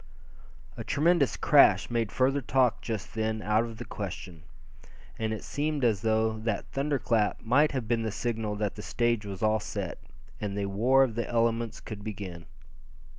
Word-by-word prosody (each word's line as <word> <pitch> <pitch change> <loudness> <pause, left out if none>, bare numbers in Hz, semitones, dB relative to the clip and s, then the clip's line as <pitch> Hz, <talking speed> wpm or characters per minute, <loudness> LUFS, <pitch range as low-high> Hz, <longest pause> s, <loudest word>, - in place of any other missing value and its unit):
A - - -5
tremendous 155 -1 +2
crash - - +5
made 115 -3 0
further 135 +2 +2
talk 125 -2 +2
just 110 -4 -5
then 110 -1 -2
out 105 +2 +2
of 115 -2 -8
the - - -7
question. 90 -4 -7 0.8
And 110 -1 -1
it 110 - -4
seemed 150 -1 -2
as 110 -5 +2
though 110 0 +1
that 110 -2 -3
thunder 140 +1 0
clap 110 -3 0
might 140 +7 +4
have 130 -5 -2
been 115 0 +1
the 110 -1 -2
signal 110 -1 -2
that 105 -1 -2
the 105 - -8
stage 115 -1 0
was 95 0 -6
all 110 0 +3
set, - - -5 0.4
and 100 -1 -3
the 100 - -1
war 120 +8 +4
of 125 -4 -1
the 115 +1 -3
elements 115 -1 0
could 100 -2 -8
begin. 95 -6 -7
110 Hz, 175 wpm, -28 LUFS, 105-120 Hz, 0.8 s, crash